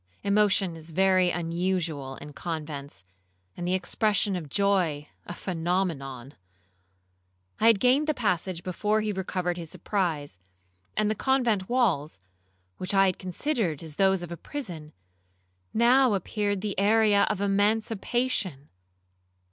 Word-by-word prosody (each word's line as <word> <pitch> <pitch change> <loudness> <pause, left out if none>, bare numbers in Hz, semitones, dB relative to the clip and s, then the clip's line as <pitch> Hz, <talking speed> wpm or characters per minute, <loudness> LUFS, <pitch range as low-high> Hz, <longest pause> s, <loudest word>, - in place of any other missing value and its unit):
Emotion 200 -3 +2
is 160 0 -5
very 185 +1 +3
unusual 170 -5 -2
in 150 +2 -10
convents, 150 - -6 0.5
and 175 - -4
the 185 - +2
expression 200 +2 +1
of 160 -5 -5
joy 175 -5 +1 0.2
a - - -5
phenomenon. 165 -8 -2 1.3
I 225 - +4
had 225 -3 +6
gained 260 +6 +3
the 305 - +1
passage 180 -6 -1
before 210 +4 0
he 215 0 -1
recovered 185 -2 -2
his 165 -2 -6
surprise; 155 - -2 0.6
and 215 0 +2
the - - +2
convent 235 -5 +1
walls, 195 - +1 0.6
which 185 +2 -2
I 195 0 +6
had 185 -2 0
considered 185 - -1
as 155 -2 -8
those 190 -2 +3
of 175 - -8
a 170 - -5
prison, 175 - -7 0.8
now 240 0 +4
appeared 205 +1 -2
the 205 -2 -3
area 210 0 +4
of - - -1
emancipation. 205 - 0
190 Hz, 130 wpm, -27 LUFS, 165-210 Hz, 1.3 s, had